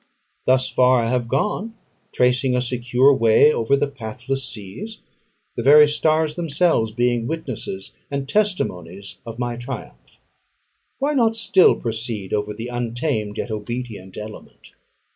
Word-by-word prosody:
Thus 130 0 +3
far 125 -1 +3
I 115 - -1
have 125 -2 0
gone, 210 - -1 0.4
tracing 125 +1 +2
a 125 - +1
secure 125 +2 +3
way 115 +5 +5
over 115 +4 +2
the 140 - +1
pathless 135 0 -5
seas: 115 - -8 0.6
the - - -2
very 150 +2 +7
stars 155 +1 +1
themselves 160 -8 +1
being 120 0 0
witnesses 130 -11 -5 0.2
and 140 -1 -3
testimonies 100 - -2
of 115 0 -7
my 120 -1 -3
triumph. 120 - -9 0.8
Why 285 +2 0
not 230 -5 +2
still 200 -4 +4
proceed 115 -4 -4
over 105 0 -1
the 115 +3 -6
untamed 120 -2 -2
yet - - -4
obedient 110 -3 -6
element? 105 0 -10
125 Hz, 135 wpm, -21 LUFS, 110-145 Hz, 0.8 s, very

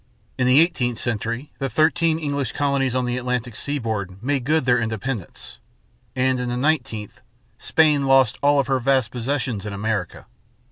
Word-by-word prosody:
In 125 - +2
the 130 +3 +6
eighteenth 130 -9 +1
century 115 +4 -3
the 135 -1 -2
thirteen 160 +5 +2
English 145 -5 -2
colonies 140 -3 0
on 130 -1 +1
the 120 0 -2
Atlantic 125 -2 -3
seaboard 110 -10 -3
made 135 -2 -1
good 155 -1 +1
their 125 -1 +3
independence; 115 -2 -5 0.6
and 130 0 +1
in 125 -1 -2
the 120 - -2
nineteenth, 125 -7 -2 0.4
Spain 150 -3 +2
lost 135 -4 +4
all 145 0 +4
of 140 - +2
her 135 -1 +1
vast 130 -2 +1
possessions 125 -4 -2
in 105 -1 -5
America. 100 -2 -3
130 Hz, 160 wpm, -22 LUFS, 115-140 Hz, 0.6 s, the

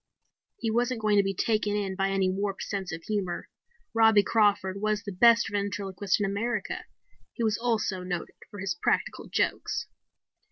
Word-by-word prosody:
He 225 - -1
wasn't 240 +1 +1
going 215 -1 +2
to 200 - +5
be 195 0 -2
taken 210 0 +1
in 195 -2 -2
by 195 0 0
any 195 -1 +1
warped 195 +1 -2
sense 195 -3 -4
of 160 0 -6
humor. 200 -5 -3 0.4
Robbie 220 -2 +6
Crawford 200 -3 +2
was 215 0 0
the 205 - -5
best 230 +5 +5
ventriloquist 200 -1 -1
in 205 - +1
America. 205 +2 -2 0.5
He 235 - -3
was 215 -1 +1
also 220 -5 0
noted 180 -2 -4 0.2
for 205 - -10
his 190 -2 -1
practical 175 - -1
jokes. - - -1
205 Hz, 165 wpm, -28 LUFS, 195-220 Hz, 0.5 s, Robbie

